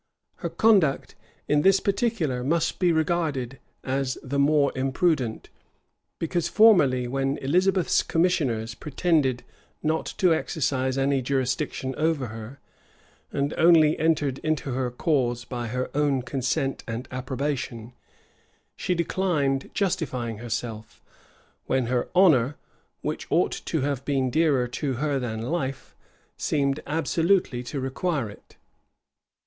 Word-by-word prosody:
Her - - -4
conduct 195 -11 +3 0.3
in 150 0 +3
this 195 +3 +5
particular 195 - 0
must 165 +4 0
be 180 -2 +3
regarded 155 -6 -1 0.2
as 135 0 -1
the 140 +1 -2
more 145 0 +3
imprudent; 130 -2 0 0.7
because 170 0 -1
formerly, 150 - +5
when 135 +2 -1
Elizabeth's 180 +6 +2
commissioners 140 -11 0
pretended 145 -3 0 0.4
not 160 +1 0
to 180 -3 +4
exercise 130 -4 -1
any 135 0 +1
jurisdiction 130 0 -1
over 155 -6 0
her, 115 +4 -9 0.7
and 140 +1 -1
only 160 -2 +6
entered 150 -4 +1
into 155 -3 -2
her 130 0 -1
cause 120 -3 0
by 120 -2 -4
her 125 +2 -3
own 145 -3 +1
consent 135 +1 -2
and 115 +2 -5
approbation, 130 -2 -4 0.8
she 180 - -1
declined 160 -6 0
justifying 125 - -2
herself, 115 -1 -5 0.7
when 130 -2 +1
her 125 +1 -1
honor, 150 -8 +5 0.5
which - - -3
ought - - +2
to 160 - -1
have 140 -1 -2
been 135 -3 0
dearer 145 -5 +2
to 135 +3 -3
her 140 +2 -1
than 110 -3 -4
life, 130 - -3 0.4
seemed 140 -1 0
absolutely 165 -3 +1
to 130 +3 -5
require 135 - -2
it. - - -18
140 Hz, 120 wpm, -25 LUFS, 125-160 Hz, 0.8 s, only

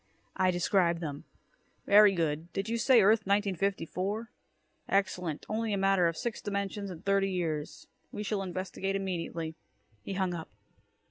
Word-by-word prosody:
I 185 0 +3
described 175 -1 +2
them. 145 -4 -5 0.6
"Very 205 -1 +7
good. 165 0 -1
Did 195 +2 -2
you 230 +1 -1
say 235 -2 +6
Earth 215 0 +4
1954? 200 +2 -1 0.6
Excellent. 180 -5 0
Only 220 0 -1
a - - +1
matter 195 -2 +3
of 165 -1 -2
six 235 -2 -3
dimensions 200 0 -3
and 175 -1 -9
thirty 195 0 +2
years. 160 -5 -3 0.3
We 210 - -4
shall 210 -1 -1
investigate 190 +1 -3
immediately." 170 -4 -3 0.5
He 195 - -5
hung 190 -2 0
up. 165 -2 -6
195 Hz, 145 wpm, -30 LUFS, 170-200 Hz, 0.6 s, Very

